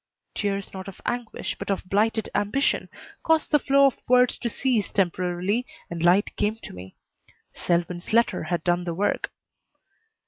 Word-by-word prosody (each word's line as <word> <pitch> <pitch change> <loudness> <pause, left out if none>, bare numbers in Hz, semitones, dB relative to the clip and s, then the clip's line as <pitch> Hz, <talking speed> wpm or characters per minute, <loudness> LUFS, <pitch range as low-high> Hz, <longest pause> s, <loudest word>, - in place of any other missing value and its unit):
Tears 200 -1 -2
not 190 0 -7
of 195 - -9
anguish, 240 -2 -3
but - - -6
of 195 -2 -1
blighted 220 +3 +1
ambition, 235 +8 0 0.3
caused 320 -1 +2
the 295 - +5
flow 275 0 +4
of 270 - +2
words 250 0 +5
to 235 - -2
cease 235 -3 0
temporarily, 185 +3 0 0.3
and 170 -1 -4
light 180 +4 +3
came 210 +1 +1
to - - -8
me. 90 +1 -10 0.6
Selwyn's 175 +1 -1
letter 230 -6 +2
had 175 0 -2
done 175 0 +1
the 170 -1 -3
work. 205 +4 0
200 Hz, 160 wpm, -25 LUFS, 175-235 Hz, 0.6 s, the